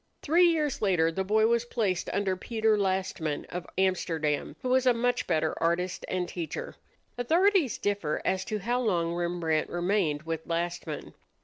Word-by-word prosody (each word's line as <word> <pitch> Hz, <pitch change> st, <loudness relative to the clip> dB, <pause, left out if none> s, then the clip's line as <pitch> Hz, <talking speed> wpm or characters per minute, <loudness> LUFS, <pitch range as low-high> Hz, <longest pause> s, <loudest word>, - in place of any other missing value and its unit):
Three 345 Hz, +4 st, +5 dB
years 305 Hz, -5 st, 0 dB
later 175 Hz, -5 st, +3 dB
the 190 Hz, +4 st, -2 dB
boy 215 Hz, +3 st, +3 dB
was 235 Hz, +1 st, +2 dB
placed 210 Hz, -7 st, -1 dB
under 195 Hz, -2 st, 0 dB
Pieter 220 Hz, +2 st, +1 dB
Lastman, 190 Hz, -6 st, -1 dB
of 180 Hz, 0 st, -5 dB
Amsterdam, 165 Hz, -6 st, 0 dB
who 255 Hz, -, -1 dB
was 260 Hz, 0 st, +3 dB
a 245 Hz, -, +5 dB
much 245 Hz, +1 st, 0 dB
better 160 Hz, -2 st, +1 dB
artist 175 Hz, +2 st, 0 dB
and 180 Hz, -1 st, -1 dB
teacher. 165 Hz, -4 st, -5 dB, 0.5 s
Authorities 340 Hz, -, +3 dB
differ 200 Hz, -7 st, -1 dB
as 190 Hz, 0 st, +1 dB
to 215 Hz, -3 st, -2 dB
how 240 Hz, +5 st, -1 dB
long 170 Hz, -7 st, 0 dB
Rembrandt 170 Hz, -2 st, -1 dB
remained 175 Hz, -4 st, 0 dB
with 165 Hz, -1 st, -4 dB
Lastman. 170 Hz, -2 st, -3 dB
190 Hz, 155 wpm, -28 LUFS, 170-230 Hz, 0.5 s, Three